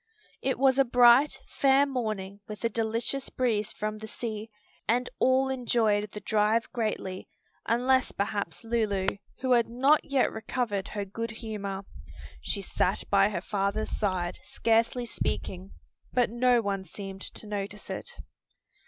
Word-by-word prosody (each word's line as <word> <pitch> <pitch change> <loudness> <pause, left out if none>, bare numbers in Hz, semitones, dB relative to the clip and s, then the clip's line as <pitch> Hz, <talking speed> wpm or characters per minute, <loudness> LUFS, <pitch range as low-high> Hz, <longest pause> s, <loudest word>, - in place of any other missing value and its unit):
It 265 - 0
was 270 0 +4
a - - +8
bright, 245 +3 +6 0.2
fair 275 0 +5
morning 215 -7 -3
with 210 0 -8
a - - +3
delicious 230 +4 -1
breeze 220 -5 0
from 215 0 -4
the 220 - -7
sea, 220 -1 -5 0.4
and 245 +2 +2
all 260 +1 +4
enjoyed 225 -5 +1
the 210 - -7
drive 215 +2 +2
greatly, 210 -5 -3 0.4
unless 255 +3 +3
perhaps 200 -3 -3
Lulu, 220 -4 0 0.4
who 260 -1 0
had 235 -2 +4
not 270 +6 +4
yet 275 -2 +2
recovered 220 -3 -2
her 205 -1 -4
good 230 +4 -4
humor. 210 -3 -5 0.6
She 200 - -3
sat 185 0 0
by 200 0 +5
her 180 -5 -3
father's 200 +2 -1
side, 185 -4 -1
scarcely 230 +2 +1
speaking, 190 -4 -3 0.4
but 245 -3 +2
no 240 0 +3
one 195 -1 -1
seemed 195 0 -8
to - - -4
notice 205 0 -4
it. - - -4
220 Hz, 145 wpm, -28 LUFS, 200-245 Hz, 0.6 s, a